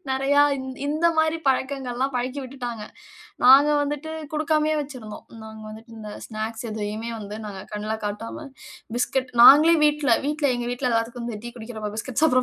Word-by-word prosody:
நெறையா 275 +2 +3 0.4
இந்த 310 +3 +1
மாதிரி 315 +1 +2
பழக்கங்கள்லாம் 265 0 -1
பழக்கி 255 +3 -3
விட்டுட்டாங்க. 245 -4 -6 0.6
நாங்க 275 +4 +8
வந்துட்டு 295 +2 -4 0.2
குடுக்காமயே 310 0 +1
வச்சுருந்தோம். 255 -7 -8 0.2
நாங்க 220 0 -10
வந்துட்டு 220 +2 -12
இந்த 215 -1 -8
ஸ்நாக்ஸ் 220 +1 -5
எதையுமே 215 +1 -4
வந்து, 210 0 -7
நாங்க 200 -2 -7
கண்ல 210 +1 -3
காட்டாம 210 +8 -5 0.5
பிஸ்கட் 255 +1 -1
நாங்களே 305 +6 +9
வீட்ல-வீட்ல 295 0 +2
எங்க 240 0 -4
வீட்ல 250 +1 -2
எல்லாருக்கும் 235 +1 -2
டீ 240 - -5
குடிக்கிற 220 -1 -8
பிஸ்கட்ஸ் 255 +4 -3
சாப்புட்ற 255 -5 +4
250 Hz, 140 wpm, -24 LUFS, 220-285 Hz, 0.6 s, நாங்களே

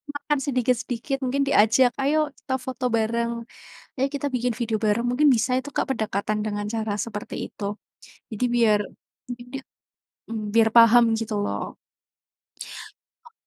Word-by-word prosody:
makan 290 0 -1
sedikit-sedikit 255 0 -1
mungkin 270 +2 0
diajak, 245 0 +5
ayo 300 +2 +2
kita 260 - -5
foto 260 0 -4
bareng, 230 +1 +1 0.6
ayo 270 +1 +1
kita 285 0 -2
bikin 250 -1 0
video 230 -2 -1
bareng, 215 +2 +1
mungkin 290 +4 +4
bisa 235 +3 0
itu 260 +2 -7
Kak 280 - -1
pendekatan 215 -2 -2
dengan 205 -1 -3
cara 220 -2 -1
seperti 210 -2 -6
itu. 205 0 -5 0.6
Jadi 220 +3 -1
biar 220 -3 +4 0.5
mungkin 245 0 -7
di 270 - -3 0.7
mmm, 220 -1 -4
biar 225 -1 +5
paham 235 +1 +8 0.2
gitu 220 -1 -3
loh. - - -4 1.5
O - - -18
235 Hz, 145 wpm, -24 LUFS, 220-260 Hz, 1.5 s, paham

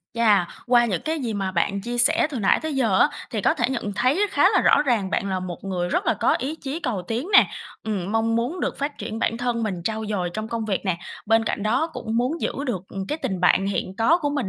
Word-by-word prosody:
Chà, 215 -6 +4 0.2
qua 240 -1 +5
những 195 -7 -1
cái 315 0 -2
gì 235 -5 -3
mà 195 -2 -2
bạn 195 +3 0
chia 240 +3 -4
sẻ 305 +7 +4
từ 265 - -4
nãy 195 - +3
tới 315 -2 -3
giờ 225 -8 +2
á, - - +5 0.2
thì 220 - -2
có - - +2
thể - - -2
nhận 220 -6 -3
thấy 290 - +2
khá - - +4
là - - +5
rõ 290 - +4
ràng 230 -9 0
bạn 200 - -1
là 185 - -1
một 180 0 -7
người 180 -2 -2
rất - - -1
là - - +3
có 215 - +2
ý 280 +6 -3
chí 280 +4 -5
cầu 225 - -2
tiến 240 +9 -2
nè. - - +8 0.4
Ừm, 205 -2 -3
mong 225 0 +1
muốn 270 +10 -2
được - - -2
phát 285 +1 -3
triển 220 +1 -5
bản 230 - 0
thân 240 -1 -1
mình, 185 -5 -3
trau 220 +3 -2
dồi 185 -4 -2
trong 215 0 -4
công 230 -1 -3
việc 205 -2 -2
nè, 185 -3 0 0.3
bên 225 0 +3
cạnh 205 - -2
đó 230 +9 +1
cũng 225 -1 -4
muốn 255 +8 0
giữ - - -1
được, 205 -9 -2
ừm, 195 0 -5
cái 300 - -2
tình 190 -2 -2
bạn 185 +2 +3
hiện 190 -1 -3
có 320 +10 +4
của 290 -3 -1
mình 280 -9 -2
225 Hz, 270 wpm, -23 LUFS, 195-255 Hz, 0.4 s, nè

